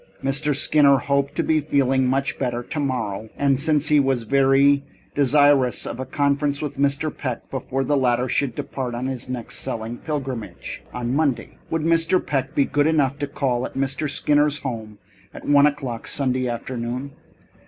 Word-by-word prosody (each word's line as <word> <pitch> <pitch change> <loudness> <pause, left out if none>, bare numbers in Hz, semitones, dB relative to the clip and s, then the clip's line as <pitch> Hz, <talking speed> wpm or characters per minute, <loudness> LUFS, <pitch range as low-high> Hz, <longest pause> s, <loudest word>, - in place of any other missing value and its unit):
Mr. 145 +2 +1
Skinner 140 -1 +4
hoped 140 +1 0
to - - 0
be 155 -1 +2
feeling 135 -3 +1
much 135 +2 -1
better 120 -2 -2
tomorrow, 125 -8 -3
and 140 -2 +2
since 150 0 +1
he 150 -1 +5
was 135 -3 +1
very 140 +3 +4 0.3
desirous 145 -2 +3
of 120 - -5
a 130 - -4
conference 140 0 0
with 145 -2 -4
Mr. 140 +2 +1
Peck 130 -4 -5
before 135 0 -2
the 145 +3 +1
latter 125 -2 +2
should 130 -2 0
depart 125 -3 -4
on 120 +2 -3
his 130 -1 -4
next 125 -3 -4
selling 115 +1 -4
pilgrimage, 130 - -5
on 125 0 -3
Monday, 145 -4 -1
would 165 -1 -1
Mr. 165 +2 +3
Peck 135 0 -2
be 140 - +3
good 145 +1 +1
enough 145 -3 +1
to 145 - -2
call 130 -3 -1
at - - -6
Mr. 135 +2 -1
Skinner's 145 +1 +2
house 110 -5 -5 0.4
at - - -9
one 145 0 +6
o'clock 130 -5 -4
Sunday 130 -2 0
afternoon? 120 +2 -4
135 Hz, 170 wpm, -22 LUFS, 125-145 Hz, 0.4 s, one